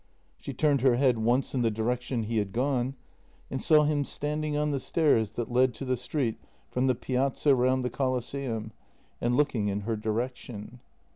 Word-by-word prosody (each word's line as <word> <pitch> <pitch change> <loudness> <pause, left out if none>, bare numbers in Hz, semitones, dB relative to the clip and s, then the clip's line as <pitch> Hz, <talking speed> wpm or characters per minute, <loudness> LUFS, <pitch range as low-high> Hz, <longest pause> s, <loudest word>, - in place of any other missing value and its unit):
She - - -6
turned 145 -4 +2
her 130 -2 +4
head 125 -2 +3
once 120 +4 +1
in 130 - 0
the 115 - +3
direction 120 +2 -1
he 115 +1 -2
had 100 -2 -3
gone 130 +1 0 0.6
and 135 - -2
saw 155 -2 +5
him 150 -1 +1
standing 150 +1 -2
on 150 0 +1
the 140 - 0
stairs 125 -8 +2
that 120 0 -4
led 125 0 +3
to 135 - -6
the 130 0 +1
street 125 -1 -2 0.3
from 125 +1 +1
the 130 - +3
Piazza 135 +3 +1
round 130 0 +2
the 125 - -1
Colosseum, 130 -3 -2 0.5
and 120 +1 +1
looking 130 -8 +1
in 100 0 -1
her 110 +2 -2
direction. 115 +1 -4
125 Hz, 185 wpm, -28 LUFS, 115-140 Hz, 0.6 s, saw